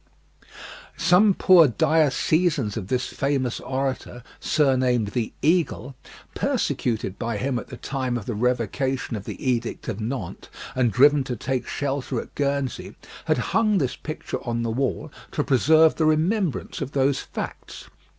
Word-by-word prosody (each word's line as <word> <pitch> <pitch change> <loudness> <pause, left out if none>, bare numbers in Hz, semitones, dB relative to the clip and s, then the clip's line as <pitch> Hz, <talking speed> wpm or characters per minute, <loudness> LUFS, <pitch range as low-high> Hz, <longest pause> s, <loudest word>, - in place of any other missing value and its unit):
Some 180 +4 +4
poor 180 -5 +6
diocesans 150 - +1
of 100 -5 -5
this 125 +3 0
famous 135 -4 -1
orator, 130 -2 -3 0.2
surnamed 130 -7 +2
the 115 +1 -2
"Eagle," 160 -5 +1 0.4
persecuted 110 -5 -1
by 115 -2 -2
him 130 +1 -1
at - - -9
the 125 - -9
time 130 -2 -2
of 110 - -7
the 120 - -3
Revocation 125 +3 -1
of 100 -2 -6
the - - -6
Edict 120 -2 -1
of 110 -1 -4
Nantes, 110 -5 -5 0.2
and 125 -3 +1
driven 145 +3 +5
to 125 -2 -3
take 130 +3 -3
shelter 140 -3 -2
at - - -9
Guernsey, 140 -2 -2 0.3
had - - +2 0.2
hung 215 -2 +3
this 135 -7 0
picture 155 - -5
on 115 -1 -2
the 115 - -1
wall 135 +5 -2 0.2
to 145 - 0
preserve 155 +4 +4
the 160 - 0
remembrance 165 +3 0
of 140 0 -4
those 135 0 +2
facts. - - -7
135 Hz, 150 wpm, -24 LUFS, 120-150 Hz, 0.4 s, poor